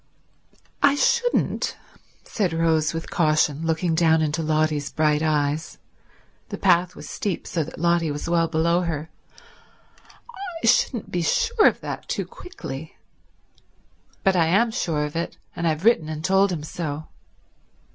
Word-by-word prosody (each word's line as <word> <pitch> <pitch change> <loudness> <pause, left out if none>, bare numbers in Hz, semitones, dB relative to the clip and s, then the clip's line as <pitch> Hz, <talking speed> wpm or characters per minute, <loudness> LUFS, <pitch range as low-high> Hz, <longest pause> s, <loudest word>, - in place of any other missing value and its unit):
"I 285 0 +5
shouldn't," 485 +10 +1 0.5
said 190 -6 -1
Rose 160 -1 +2
with 165 0 -6
caution, 155 -2 +1
looking 165 +1 0
down 160 -1 +3
into 155 +1 -1
Lotty's 155 -2 0
bright 150 -1 +2
eyes—the 150 0 -4
path 180 +1 +3
was - - -10
steep, 195 -5 -3
so 165 - -1
that 155 - -10
Lotty 170 -1 +2
was 145 +2 -4
well 170 -1 +2
below 170 +2 +1
her—"I 330 - -9
shouldn't 230 -1 +2
be 175 - -1
sure 460 - +3
of - - +1
that - - -6
too - - -2
quickly." 160 - -9 1.3
"But 195 -1 +3
I 165 -2 +3
am 215 +7 +3
sure 155 -8 -1
of 150 - -7
it, 170 +1 -3 0.2
and 170 - -1
I've 160 +4 -1
written 195 -10 +4
and 155 0 -5
told 195 +1 +3
him 160 -4 -4
so." 155 -2 -5
165 Hz, 140 wpm, -23 LUFS, 155-185 Hz, 1.3 s, I